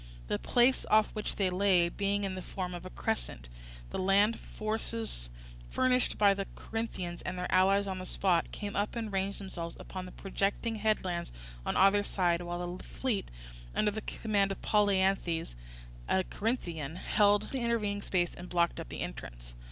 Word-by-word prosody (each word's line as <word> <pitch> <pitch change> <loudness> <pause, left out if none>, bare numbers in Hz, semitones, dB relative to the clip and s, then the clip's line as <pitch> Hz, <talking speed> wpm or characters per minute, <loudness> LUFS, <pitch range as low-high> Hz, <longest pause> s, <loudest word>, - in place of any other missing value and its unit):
The 105 - 0
place 245 +2 +3
off 215 0 +5
which 215 -1 -3
they 190 -2 +1
lay 180 -2 +4
being 200 +3 0
in 195 -1 -1
the 185 - -5
form 180 -1 -4
of 175 - -6
a - - -8
crescent, - - -3 0.4
the - - -2
land 200 +4 +4
forces 215 - -2 0.4
furnished 255 -1 +2
by 200 -1 +6
the 195 0 -3
Corinthians 190 -6 -4
and 180 - -4
their 180 - -3
allies 195 +2 +5
on 190 -1 -3
the 185 - -5
spot 180 -4 +2
came 205 -1 -5
up 205 +3 0
and 225 -3 -3
ranged 195 +1 0
themselves 175 -4 -5
upon 185 -1 -6
the - - -9
projecting 200 +3 -1
headlands 190 -5 0 0.4
on - - +1
either 195 +2 +6
side, 175 -4 +1
while 175 0 -4
the - - -11
fleet, 235 -7 -2 0.5
under 210 - +3
the 215 +1 -4
command 205 -3 0
of 195 - -4
Polyanthes, 190 - +2 0.6
a 190 - +3
Corinthian, 170 - -2
held 205 +2 +3
the 270 - -1
intervening 215 -4 0
space 175 -3 0
and 180 +1 -9
blocked 170 -1 +1
up - - -6
the - - -5
entrance. - - -7
195 Hz, 175 wpm, -31 LUFS, 175-210 Hz, 0.6 s, by